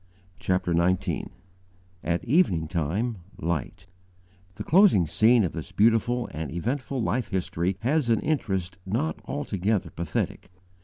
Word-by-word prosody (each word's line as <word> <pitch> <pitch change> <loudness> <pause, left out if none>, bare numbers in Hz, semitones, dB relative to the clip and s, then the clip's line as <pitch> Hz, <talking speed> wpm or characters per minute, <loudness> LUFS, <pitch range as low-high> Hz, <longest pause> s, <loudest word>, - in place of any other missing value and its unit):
CHAPTER 90 -2 0
XIX 85 +2 +1 0.8
AT 85 +2 -1
EVENING 115 - +2
TIME 95 +8 -1 0.2
LIGHT 85 +3 -3 0.7
THE - - -5
closing 175 - +5
scene 110 +8 +4
of 90 - -1
this 80 -5 -7
beautiful 115 +3 +2
and 80 -2 -5
eventful 125 - -2
life 120 +3 0
history 90 -1 -1
has 135 +2 +1
an 115 -2 +3
interest 95 - -2
not 90 -5 -1
altogether 95 +2 -1
pathetic. 85 0 -3
95 Hz, 120 wpm, -26 LUFS, 85-120 Hz, 0.8 s, closing